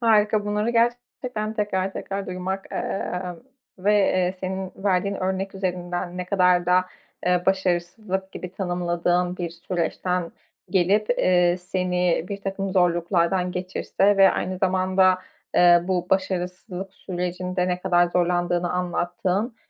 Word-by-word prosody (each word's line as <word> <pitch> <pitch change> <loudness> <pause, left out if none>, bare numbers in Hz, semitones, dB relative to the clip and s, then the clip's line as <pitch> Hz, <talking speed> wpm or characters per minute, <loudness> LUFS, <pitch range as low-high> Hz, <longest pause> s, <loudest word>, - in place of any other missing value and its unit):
Harika, 215 -2 +3
bunları 210 +2 0
gerçekten 235 -1 -1
tekrar 195 -3 -1
tekrar 195 0 -4
duymak, 185 +1 -4
ııı, 180 0 -3 0.4
ve, 205 +3 +2
eee, 185 -3 +2
senin 190 0 -4
verdiğin 200 0 0
örnek 190 +1 -2
üzerinden 180 -1 -3
ne 180 - -3
kadar 180 -2 +3
da, 180 +1 +4 0.4
eee, 180 0 +3
başarısızlık 190 +1 -1
gibi 180 0 -7
tanımladığın 175 -1 0
bir 175 -2 -3
süreçten 175 0 -2 0.4
gelip, 200 +3 +2
eee, 180 -5 +3
seni 180 -2 0
birtakım 195 -1 -3
zorluklardan 180 0 +2
geçirse 190 +2 0
ve 195 -1 +7
aynı 185 0 -2
zamanda, 185 0 +3 0.4
eee, 175 -1 +7
bu 180 -1 -1
başarısızlık 185 0 -2
sürecinde 180 0 -3
ne 180 0 -1
kadar 175 -2 +3
zorlandığını 175 0 0
anlattığın 180 +5 -1
185 Hz, 120 wpm, -24 LUFS, 180-195 Hz, 0.4 s, ve